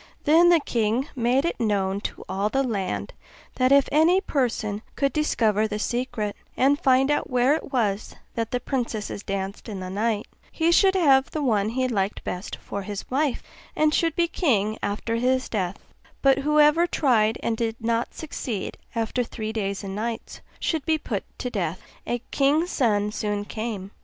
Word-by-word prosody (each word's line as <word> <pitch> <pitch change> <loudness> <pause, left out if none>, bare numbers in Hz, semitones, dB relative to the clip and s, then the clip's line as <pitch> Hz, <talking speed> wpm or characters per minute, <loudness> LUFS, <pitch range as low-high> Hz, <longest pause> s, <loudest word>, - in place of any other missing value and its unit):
Then 330 +4 +6
the 345 -1 +6
king 235 0 0
made 250 +3 +2
it 340 - -2
known 200 -3 0
to - - -5
all 195 +2 -1
the 270 +4 +1
land, 205 -7 -2 0.4
that 255 0 +3
if 280 -1 +6
any 325 +5 +5
person 235 - -1
could 275 -1 +1
discover 220 -8 +2
the 210 -1 -3
secret, 235 -2 -2 0.2
and 280 +2 +3
find 265 +2 +4
out 295 - 0
where 250 +2 +3
it 310 - -3
was 215 -5 -1 0.2
that 230 -1 -2
the 250 - -1
princesses 235 -6 -3
danced 195 +1 -4
in 200 -3 -5
the 185 0 -6
night, 215 +1 0 0.3
he 330 0 +2
should 385 +2 +5
have 275 -7 +4
the 305 - -3
one 215 -5 +2
he 255 +3 0
liked 200 -4 -1
best 180 +3 -4
for 200 - -6
his 205 +1 -6
wife, 280 -1 0 0.3
and 305 0 +3
should 330 -1 +1
be 340 -1 +2
king 215 - +1
after 220 +3 -2
his 255 +2 +1
death; 190 -3 -2 0.5
but 270 0 +5
whoever 300 +3 +4
tried 230 -9 +2
and 230 - 0
did 225 0 -1
not 230 0 -1
succeed, 250 -9 -5 0.2
after 230 +2 0
three 220 -2 -5
days 200 -3 -2
and 195 -1 -5
nights, 225 +2 -4 0.2
should 320 -4 -1
be 315 +1 +2
put 220 -9 -3
to 250 - -4
death. 180 -5 -2 0.3
A 240 0 -2
king's 300 +5 +2
son 210 -5 +1
soon 205 -1 -2
came. 210 -3 -5
235 Hz, 175 wpm, -25 LUFS, 210-275 Hz, 0.5 s, Then